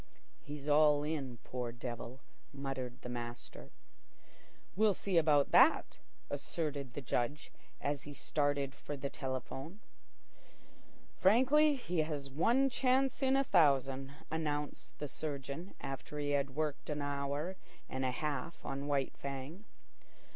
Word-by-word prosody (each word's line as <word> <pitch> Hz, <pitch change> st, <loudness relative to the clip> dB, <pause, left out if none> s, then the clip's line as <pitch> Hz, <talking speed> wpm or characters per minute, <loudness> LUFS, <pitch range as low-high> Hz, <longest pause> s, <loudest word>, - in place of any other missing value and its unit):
"He's 145 Hz, 0 st, -7 dB
all 150 Hz, 0 st, +5 dB
in, 140 Hz, -5 st, -3 dB
poor 125 Hz, -2 st, -3 dB
devil," 120 Hz, +1 st, -6 dB, 0.3 s
muttered 135 Hz, -3 st, -4 dB
the -, -, -5 dB
master. 120 Hz, -1 st, -6 dB, 1.1 s
"We'll 210 Hz, 0 st, +4 dB
see 185 Hz, -4 st, +2 dB
about 150 Hz, -3 st, +4 dB
that," -, -, +5 dB, 0.3 s
asserted 145 Hz, -2 st, -3 dB
the 145 Hz, -, -4 dB
Judge, 120 Hz, +4 st, -1 dB, 0.3 s
as 145 Hz, 0 st, -1 dB
he 145 Hz, -1 st, -8 dB
started 145 Hz, -2 st, 0 dB
for 145 Hz, +1 st, -6 dB
the 140 Hz, 0 st, -3 dB
telephone. 135 Hz, -, -5 dB, 1.4 s
"Frankly, 270 Hz, +9 st, +6 dB
he 180 Hz, -10 st, -2 dB
has 150 Hz, -3 st, -1 dB
one 235 Hz, -, +4 dB
chance 265 Hz, +1 st, +2 dB
in 265 Hz, 0 st, +4 dB
a 275 Hz, -, +4 dB
thousand," 135 Hz, -, +3 dB, 0.2 s
announced 150 Hz, -2 st, -3 dB
the 150 Hz, -, -3 dB
surgeon, 145 Hz, +4 st, -5 dB
after 135 Hz, +2 st, -5 dB
he 145 Hz, -1 st, 0 dB
had 140 Hz, -2 st, 0 dB
worked 150 Hz, -1 st, -2 dB
an 150 Hz, -1 st, -1 dB
hour 145 Hz, +5 st, -2 dB, 0.3 s
and 130 Hz, 0 st, -3 dB
a 130 Hz, -, +2 dB
half 150 Hz, +3 st, -3 dB
on 140 Hz, +1 st, -3 dB
White 140 Hz, -2 st, 0 dB
Fang. 140 Hz, +8 st, -6 dB
145 Hz, 130 wpm, -35 LUFS, 135-160 Hz, 1.4 s, Frankly